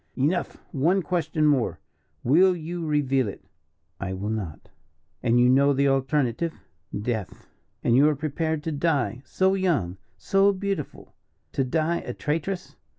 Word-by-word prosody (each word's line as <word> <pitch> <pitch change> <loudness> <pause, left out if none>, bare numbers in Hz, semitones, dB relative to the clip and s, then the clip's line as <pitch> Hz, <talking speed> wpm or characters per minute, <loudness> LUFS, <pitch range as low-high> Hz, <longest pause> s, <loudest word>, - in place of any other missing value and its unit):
"Enough. 155 +7 0
One 170 +7 +2
question 160 -3 0
more 135 - +2 0.4
will 180 +8 +5
you 170 0 -5
reveal 135 -4 +1
it?" 100 - -8 0.5
"I 95 -1 -3
will 100 +3 -3
not." 100 -9 -5 0.5
"And 120 0 +3
you 125 - +5
know 140 +3 +5
the 140 +1 +2
alternative?" 135 +3 0 0.4
"Death!" 110 -3 -4 0.4
"And 115 - +3
you 145 +4 +6
are 150 - 0
prepared 155 +1 -2
to 160 - -2
die 140 -7 0
so 190 +9 +2
young, 155 - 0 0.2
so 195 +1 +3
beautiful, 195 -6 -4 0.4
to 135 - 0
die 160 +5 0
a - - -6
traitress?" 165 +5 -3
145 Hz, 145 wpm, -25 LUFS, 125-170 Hz, 0.5 s, you